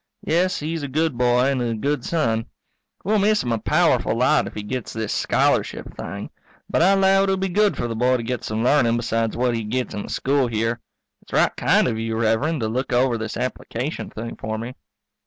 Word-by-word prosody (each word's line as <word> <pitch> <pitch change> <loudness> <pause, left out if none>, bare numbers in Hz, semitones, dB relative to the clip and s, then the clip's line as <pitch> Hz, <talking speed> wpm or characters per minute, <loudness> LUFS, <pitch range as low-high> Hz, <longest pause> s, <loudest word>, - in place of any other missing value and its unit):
Yes, 180 +4 +1
he's 160 +1 -3
a 145 - -3
good 155 +1 0
boy 125 +2 +3
and 130 -2 -1
a 115 -2 -1
good 140 +4 -1
son. 115 -9 0 0.6
We'll 210 +2 +2
miss 210 +1 +3
him 120 - -2
a 115 - 0
powerful - - +2
lot - - +3
if - - -9
he 105 - -4
gets 125 +2 -4
this 110 -1 -3
scholarship - - 0
thing. - - -6 0.4
But - - +1
I 190 +3 +5
'low 195 0 +4
it'll 195 -1 +1
be 190 0 -1
good 210 +3 +2
for 120 - -2
the 115 - -4
boy 125 +3 +2
to 115 - -5
get 125 0 -3
some 110 +1 -2
learnin' 120 -3 +3
besides 115 -1 -1
what 125 0 +1
he 115 -1 -2
gets 125 +4 -2
in 105 - -3
the - - -8
school 135 -1 +1
here. 115 +1 -1 0.4
It's - - -17
right - - +3
kind - - +3
of 110 - -2
you, 115 0 -2
Rev'rend, 115 +7 +1
to 110 - 0
look 130 +4 -2
over 125 0 +2
this 110 -1 -4
application 130 +2 -4
thing 115 +2 -7
for 110 0 -4
me. 115 +3 -6
125 Hz, 220 wpm, -22 LUFS, 115-155 Hz, 0.6 s, I